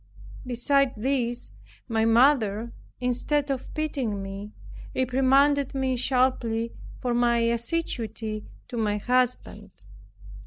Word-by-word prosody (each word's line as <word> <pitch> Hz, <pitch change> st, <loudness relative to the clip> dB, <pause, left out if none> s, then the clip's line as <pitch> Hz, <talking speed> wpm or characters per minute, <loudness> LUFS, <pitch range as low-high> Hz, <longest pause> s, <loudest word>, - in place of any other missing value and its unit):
Besides 260 Hz, +2 st, +2 dB
this, 245 Hz, 0 st, -1 dB, 0.4 s
my 225 Hz, -2 st, +1 dB
mother, 230 Hz, -2 st, +3 dB, 0.3 s
instead 275 Hz, +4 st, 0 dB
of 265 Hz, -2 st, -4 dB
pitying 265 Hz, -10 st, -2 dB
me, 195 Hz, +2 st, -7 dB, 0.4 s
reprimanded 270 Hz, +2 st, +3 dB
me 265 Hz, -1 st, 0 dB
sharply 245 Hz, -3 st, +1 dB, 0.3 s
for 245 Hz, -1 st, -1 dB
my 240 Hz, 0 st, +3 dB
assiduity 230 Hz, -3 st, -2 dB, 0.3 s
to 240 Hz, -, -5 dB
my 210 Hz, -2 st, +1 dB
husband. 250 Hz, +3 st, 0 dB
245 Hz, 95 wpm, -26 LUFS, 225-265 Hz, 0.4 s, mother